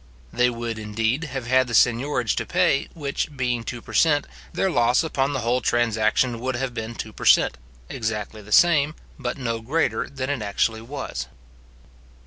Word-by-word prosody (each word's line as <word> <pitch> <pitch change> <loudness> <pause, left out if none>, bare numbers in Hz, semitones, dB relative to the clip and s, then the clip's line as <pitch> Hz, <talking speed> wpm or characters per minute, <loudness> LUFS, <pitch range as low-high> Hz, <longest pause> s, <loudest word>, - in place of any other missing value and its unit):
They 125 0 +3
would, 115 -2 -4
indeed, 110 +7 -1
have 135 -5 -5
had 130 +1 +3
the 120 - -2
seignorage 125 +1 +2
to - - -1
pay, 180 -6 +2
which 145 -1 -3
being 125 -3 -1
two 120 0 -6
per - - -11
cent., 145 -3 +3 0.3
their 190 - 0
loss 120 -2 +3
upon 140 -3 0
the 130 - -1
whole 120 +2 +1
transaction 115 +1 +1
would 130 +1 -2
have 125 0 -3
been 115 0 -5
two 110 - -6
per - - -8
cent., - - +5 0.3
exactly 110 - -4
the 105 +1 -14
same, 155 +1 +5 0.2
but 125 -1 -3
no 115 -4 -2
greater 125 -2 0
than 135 0 -3
it 140 -5 -2
actually 110 +2 0
was. 135 +4 -5
125 Hz, 175 wpm, -24 LUFS, 115-140 Hz, 0.3 s, cent